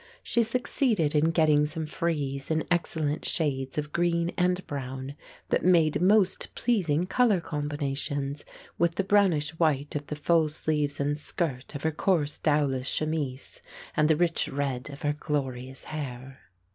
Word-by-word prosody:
She 235 Hz, -, +1 dB
succeeded 230 Hz, -, +1 dB
in 155 Hz, +1 st, +3 dB
getting 155 Hz, -3 st, +3 dB
some 160 Hz, +1 st, -4 dB
frieze 150 Hz, -4 st, -2 dB
in 160 Hz, 0 st, +1 dB
excellent 160 Hz, -3 st, 0 dB
shades 135 Hz, -5 st, -1 dB
of 150 Hz, 0 st, -2 dB
green 170 Hz, 0 st, +1 dB
and 180 Hz, +1 st, +1 dB
brown, 135 Hz, -1 st, -5 dB, 0.4 s
that -, -, +1 dB
made 170 Hz, -4 st, +4 dB
most 195 Hz, 0 st, +3 dB
pleasing 180 Hz, -9 st, +1 dB
colour 215 Hz, -1 st, +3 dB
combinations 145 Hz, -2 st, -3 dB, 0.4 s
with 170 Hz, -1 st, +2 dB
the 195 Hz, -, +1 dB
brownish 185 Hz, -7 st, +3 dB
white 145 Hz, -3 st, +1 dB
of 145 Hz, -1 st, -3 dB
the 150 Hz, -, -4 dB
full 160 Hz, +1 st, +2 dB
sleeves 150 Hz, -2 st, -1 dB
and 145 Hz, +1 st, 0 dB
skirt 150 Hz, -4 st, -3 dB
of 145 Hz, -, -5 dB
her 160 Hz, -, +2 dB
coarse 155 Hz, -2 st, 0 dB
dowlas 140 Hz, -4 st, +1 dB
chemise, 150 Hz, -4 st, -3 dB, 0.3 s
and 150 Hz, 0 st, +3 dB
the 160 Hz, -, +5 dB
rich 170 Hz, -1 st, +1 dB
red 135 Hz, -2 st, -3 dB
of 140 Hz, +1 st, -10 dB
her 145 Hz, 0 st, +1 dB
glorious 135 Hz, -4 st, -3 dB
hair. 135 Hz, -3 st, -6 dB
150 Hz, 150 wpm, -27 LUFS, 140-170 Hz, 0.4 s, the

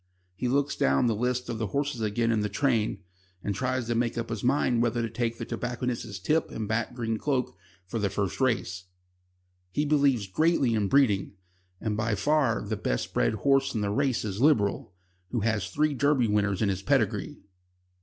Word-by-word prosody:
He 125 Hz, -, -2 dB
looks 140 Hz, +3 st, +1 dB
down 70 Hz, -, +2 dB
the 115 Hz, -, +2 dB
lists 125 Hz, +3 st, -1 dB
of 115 Hz, -2 st, -4 dB
the 110 Hz, -, -1 dB
horses 140 Hz, +2 st, -2 dB
again 115 Hz, +2 st, +1 dB
in 110 Hz, -, +2 dB
the 105 Hz, 0 st, -1 dB
train, 115 Hz, -3 st, 0 dB, 0.4 s
and 100 Hz, -, -1 dB
tries 130 Hz, +3 st, -1 dB
to 120 Hz, -, -1 dB
make 120 Hz, 0 st, 0 dB
up 115 Hz, 0 st, -3 dB
his 110 Hz, -3 st, -4 dB
mind 125 Hz, -2 st, +2 dB
whether 120 Hz, 0 st, +1 dB
to 115 Hz, -, -2 dB
take 115 Hz, 0 st, -2 dB
the -, -, -5 dB
tobacconist's 120 Hz, -3 st, -3 dB
tip 150 Hz, -, 0 dB
and 110 Hz, -2 st, -4 dB
back 115 Hz, +1 st, -1 dB
Green 115 Hz, -2 st, -2 dB
Cloak 130 Hz, -3 st, -1 dB, 0.3 s
for 115 Hz, +5 st, -4 dB
the 100 Hz, -2 st, +1 dB
first 100 Hz, +4 st, -2 dB
race. 95 Hz, -8 st, 0 dB, 0.9 s
He 150 Hz, +9 st, 0 dB
believes 140 Hz, -7 st, +3 dB
greatly 140 Hz, -, +2 dB
in 105 Hz, -2 st, +1 dB
breeding, 105 Hz, -6 st, +2 dB, 0.5 s
and 110 Hz, -2 st, -2 dB
by 110 Hz, 0 st, 0 dB
far 135 Hz, 0 st, +1 dB
the 110 Hz, +1 st, -3 dB
best -, -, -2 dB
bred 110 Hz, -, +2 dB
horse 135 Hz, -1 st, +3 dB
in 110 Hz, -, 0 dB
the 100 Hz, -1 st, -1 dB
race 130 Hz, +1 st, 0 dB
is 100 Hz, +1 st, -3 dB
Liberal, 120 Hz, -13 st, +2 dB, 0.4 s
who 120 Hz, -, -1 dB
has 105 Hz, -4 st, 0 dB
three 150 Hz, +9 st, +1 dB
Derby 140 Hz, -3 st, +2 dB
winners 105 Hz, -1 st, +1 dB
in 100 Hz, -, +2 dB
his 95 Hz, -1 st, -2 dB
pedigree. 95 Hz, -, 0 dB
115 Hz, 195 wpm, -27 LUFS, 105-130 Hz, 0.9 s, believes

